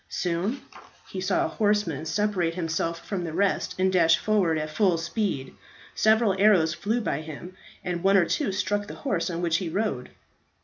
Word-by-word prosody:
Soon 180 Hz, +8 st, -2 dB, 0.5 s
he 190 Hz, -, -4 dB
saw 190 Hz, 0 st, +1 dB
a -, -, -2 dB
horseman 205 Hz, -8 st, 0 dB
separate 185 Hz, -3 st, 0 dB
himself 165 Hz, -1 st, -2 dB
from 195 Hz, -4 st, -3 dB
the 165 Hz, -2 st, -5 dB
rest 195 Hz, +3 st, 0 dB
and 185 Hz, 0 st, +1 dB
dash 165 Hz, -3 st, +5 dB
forward 195 Hz, -7 st, +1 dB
at 155 Hz, 0 st, -3 dB
full 180 Hz, +1 st, +2 dB
speed. 165 Hz, -, -3 dB, 0.4 s
Several 220 Hz, -2 st, +3 dB
arrows 180 Hz, -6 st, +5 dB
flew 220 Hz, +7 st, -1 dB
by 155 Hz, -8 st, -2 dB
him, 160 Hz, +4 st, -9 dB, 0.3 s
and 175 Hz, -1 st, -3 dB
one 195 Hz, +2 st, +4 dB
or 180 Hz, -, +4 dB
two 275 Hz, -, -1 dB
struck 205 Hz, +2 st, -1 dB
the -, -, -8 dB
horse 190 Hz, -11 st, 0 dB
on 170 Hz, 0 st, -3 dB
which 170 Hz, -1 st, +2 dB
he 175 Hz, -2 st, -3 dB
rode. 175 Hz, -, -2 dB
185 Hz, 180 wpm, -26 LUFS, 165-205 Hz, 0.5 s, dash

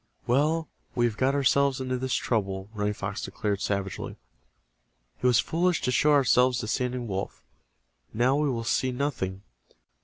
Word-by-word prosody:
"Well, 155 Hz, +6 st, +2 dB, 0.3 s
we 120 Hz, -, +3 dB
have 115 Hz, -3 st, 0 dB
got 130 Hz, +5 st, +1 dB
ourselves 140 Hz, 0 st, +3 dB
into 130 Hz, -1 st, -2 dB
this 130 Hz, 0 st, -1 dB
trouble," 100 Hz, -3 st, -1 dB
Running 105 Hz, -1 st, -1 dB
Fox 100 Hz, 0 st, -4 dB
declared, 100 Hz, +1 st, -2 dB
savagely. 100 Hz, -1 st, -3 dB, 1.1 s
"It -, -, +3 dB
was 120 Hz, -2 st, +5 dB
foolish 175 Hz, +5 st, +1 dB
to 125 Hz, -, +1 dB
show 150 Hz, +4 st, +3 dB
ourselves 125 Hz, -2 st, +4 dB
to 120 Hz, -4 st, -3 dB
Standing 125 Hz, +1 st, -1 dB
Wolf. 95 Hz, -2 st, -4 dB, 0.7 s
Now 125 Hz, +4 st, +2 dB
we 150 Hz, 0 st, +1 dB
will 115 Hz, -3 st, -2 dB
see 130 Hz, +2 st, +1 dB
nothing. 125 Hz, -8 st, -3 dB
125 Hz, 155 wpm, -27 LUFS, 105-135 Hz, 1.1 s, was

